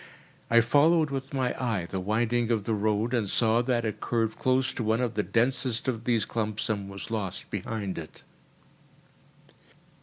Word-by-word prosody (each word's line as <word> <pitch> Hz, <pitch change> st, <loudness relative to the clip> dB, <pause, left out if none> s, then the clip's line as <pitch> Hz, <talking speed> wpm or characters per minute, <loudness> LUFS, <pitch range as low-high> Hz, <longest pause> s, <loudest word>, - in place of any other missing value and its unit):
I 115 Hz, 0 st, +6 dB
followed 150 Hz, +5 st, +4 dB
with 135 Hz, -1 st, -4 dB
my 130 Hz, -2 st, 0 dB
eye 110 Hz, -8 st, 0 dB
the 95 Hz, -, -3 dB
winding 115 Hz, +4 st, 0 dB
of 110 Hz, -3 st, +1 dB
the 110 Hz, -, -1 dB
road, 110 Hz, +3 st, 0 dB
and 110 Hz, -5 st, +1 dB
saw 115 Hz, +2 st, +3 dB
that 120 Hz, -1 st, 0 dB
it 110 Hz, -, -3 dB
curved 115 Hz, -2 st, -1 dB
close 130 Hz, +1 st, +2 dB
to 120 Hz, -, -3 dB
one 110 Hz, +1 st, +1 dB
of 125 Hz, -2 st, 0 dB
the 105 Hz, -, +1 dB
densest 125 Hz, +2 st, 0 dB
of 115 Hz, -3 st, -2 dB
these 115 Hz, -4 st, +2 dB
clumps 110 Hz, -2 st, -2 dB
and 100 Hz, -2 st, -2 dB
was 100 Hz, +3 st, -7 dB
lost 100 Hz, -4 st, -4 dB
behind 100 Hz, -2 st, -3 dB
it. 80 Hz, -, -11 dB
115 Hz, 175 wpm, -28 LUFS, 105-125 Hz, -, I